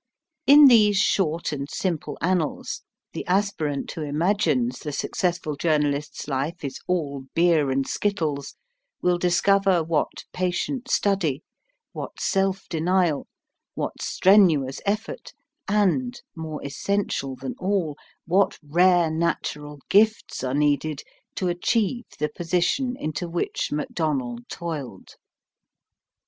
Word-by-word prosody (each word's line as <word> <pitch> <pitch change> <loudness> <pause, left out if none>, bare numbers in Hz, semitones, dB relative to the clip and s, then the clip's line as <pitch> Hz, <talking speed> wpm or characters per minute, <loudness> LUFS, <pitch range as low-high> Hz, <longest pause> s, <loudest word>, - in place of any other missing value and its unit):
In 290 +1 +9
these 215 -6 +6
short 170 -6 +1
and 140 -1 -4
simple 170 -3 -3
annals, 175 -3 -1 0.3
the - - -4
aspirant 180 -7 0
who 160 - -6
imagines 150 - +1
the 150 - -5
successful 175 +1 -2
journalist's 150 -1 -1
life 145 +4 -2
is 135 -1 -5
all 145 -7 -2
beer 165 -4 +3
and 135 +1 0
skittles 160 -9 -2 0.5
will 180 -1 +2
discover 185 0 +3
what 160 -1 -1
patient 210 +9 -2
study, 180 - +1 0.5
what - - -7
self 195 0 0
denial, 170 -2 +1 0.5
what - - -4
strenuous 170 -9 +4
effort, 215 +2 -3 0.3
and, 210 +5 +1 0.2
more 160 -3 -6
essential 140 -3 -2
than 130 +1 -5
all, 185 -6 0 0.3
what 190 +4 +2
rare 175 +2 +3
natural 150 -3 -2
gifts 215 -4 +2
are 130 +1 -1
needed 145 0 +1 0.3
to 185 - -1
achieve 220 +7 0
the 150 +1 -1
position 180 - 0
into 155 +3 -4
which 170 +1 -2
Macdonell 145 -5 -2
toiled. 150 - -6
170 Hz, 110 wpm, -24 LUFS, 150-195 Hz, 0.5 s, In